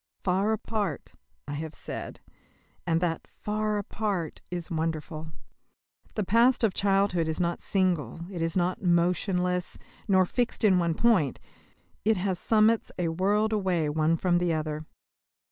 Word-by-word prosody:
"Far 190 +3 +2
apart," 220 -2 -3 0.3
I 145 - -4
have 155 +1 -5
said, - - -7 0.7
and 165 0 +2
that 170 -2 -1
"far 215 0 -2
apart" 200 -5 -3
is 175 -1 -5
wonderful. 160 -1 -3 0.8
The 215 - 0
past 235 +6 +4
of 215 -4 +3
childhood 195 -4 +2
is 160 -1 -2
not 170 -1 -1
single, 180 -5 0
is 165 -1 -1
not 180 +1 0
motionless, 180 0 +1 0.3
nor 190 -2 +4
fixed 240 +6 -1
in 190 -4 +5
one 170 -2 +1
point; 190 - +2 0.6
it 220 0 +3
has 185 -1 -1
summits 220 0 +3
a 175 -2 0
world 205 +6 +1
away 180 -7 +1
one 155 +2 +2
from 175 0 +2
the 175 -1 +1
other. 155 0 -3
180 Hz, 140 wpm, -28 LUFS, 165-205 Hz, 0.8 s, in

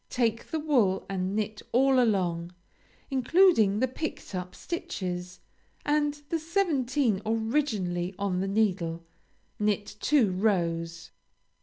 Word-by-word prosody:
Take 230 -2 0
the 320 - -1
wool 245 -11 +2
and 190 0 -2
knit 215 0 -2
all 265 +1 +4
along, 180 -6 0 0.6
including 265 - +4
the 260 - +3
picked 285 -1 -5
up 180 0 -5
stitches, 185 - -5 0.4
and 295 0 +1
the 330 - 0
seventeen 285 - +1
originally 220 -6 -1
on 195 -2 -1
the 195 - -1
needle. 180 -5 0 0.5
Knit 210 0 -1
two 260 -10 +3
rows. 170 -4 -1
215 Hz, 115 wpm, -28 LUFS, 185-270 Hz, 0.6 s, all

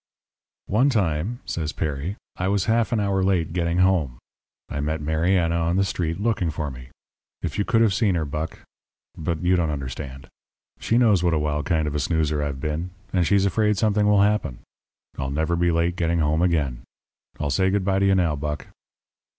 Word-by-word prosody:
"'One 125 +8 +3
time,' 100 - -1
says 80 -3 -3
Perry, 75 +5 -3 0.2
'I 90 - -1
was 100 -1 +1
half 115 0 +2
an 115 - +1
hour 100 -2 +1
late 90 -4 +1
getting 85 -1 0
home. 90 -9 +2 0.5
I 70 - -4
met 75 +2 -1
Mariana 85 +3 +1
on 85 +1 +1
the 95 - +3
street 85 -1 -2
looking 105 -5 0
for 75 -2 -3
me. 65 -1 -10 0.6
If - - -3
you 100 - +1
could 115 -1 +2
have 110 -4 +4
seen 100 -2 +2
her, 80 -2 0
Buck 75 +2 -5 0.5
but 80 +2 -3
you 90 +1 +3
don't 85 -3 +1
understand. 70 -1 -5 0.5
She 115 - +1
knows 110 -7 +4
what 85 -2 +2
a - - +2
wild 75 -1 -1
kind 80 -2 +1
of 75 - -2
a 75 - -1
snoozer 75 -1 0
I've 70 -2 -3
been, 75 +5 -3 0.2
and 90 -3 +2
she's 100 +3 +3
afraid 105 +1 +2
something 105 0 +2
will 105 -1 +5
happen. 105 -12 0 0.6
I'll 65 -1 -2
never 80 +4 0
be 85 0 +2
late 85 +1 +1
getting 85 0 +1
home 80 0 +1
again. 75 -9 0 0.6
I'll 70 - -1
say 95 +6 +2
good 95 -1 0
bye 95 0 +2
to 100 - +2
you 95 - +4
now, 85 -5 +2
Buck.' 75 +1 -4
85 Hz, 200 wpm, -24 LUFS, 75-95 Hz, 0.6 s, will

